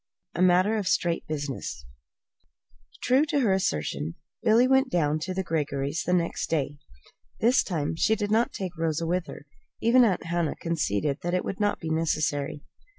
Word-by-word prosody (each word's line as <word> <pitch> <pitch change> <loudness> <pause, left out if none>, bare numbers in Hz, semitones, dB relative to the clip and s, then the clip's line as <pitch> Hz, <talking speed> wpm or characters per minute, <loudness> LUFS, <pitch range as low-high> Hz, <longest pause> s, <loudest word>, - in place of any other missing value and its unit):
A 175 - -2
MATTER 185 +4 +4
OF 205 -4 -2
STRAIGHT 170 -1 0
BUSINESS 140 - -5 1.2
True 260 +3 +4
to 290 -2 0
her 210 -6 +3
assertion, 80 - -1 0.3
Billy 230 +3 +4
went 265 +1 +3
down 155 -3 +1
to 185 +4 -4
the 190 - -1
Greggorys' 145 -2 -2
the 180 - +1
next 170 -2 0
day. 145 -2 -1 0.6
This 245 +4 +4
time 160 -5 -2
she 220 +7 +2
did 205 -1 -3
not 225 +2 +2
take 185 -3 -5
Rosa 165 0 -1
with 180 +1 -1
her. - - -10 0.3
Even 245 +2 +5
Aunt 200 -6 +1
Hannah 170 -1 -1
conceded 150 - -1
that 175 +1 -1
it 180 - -1
would 195 - -4
not 205 0 +1
be 160 -1 -4
necessary. 150 -3 -1
170 Hz, 170 wpm, -26 LUFS, 150-205 Hz, 1.2 s, Even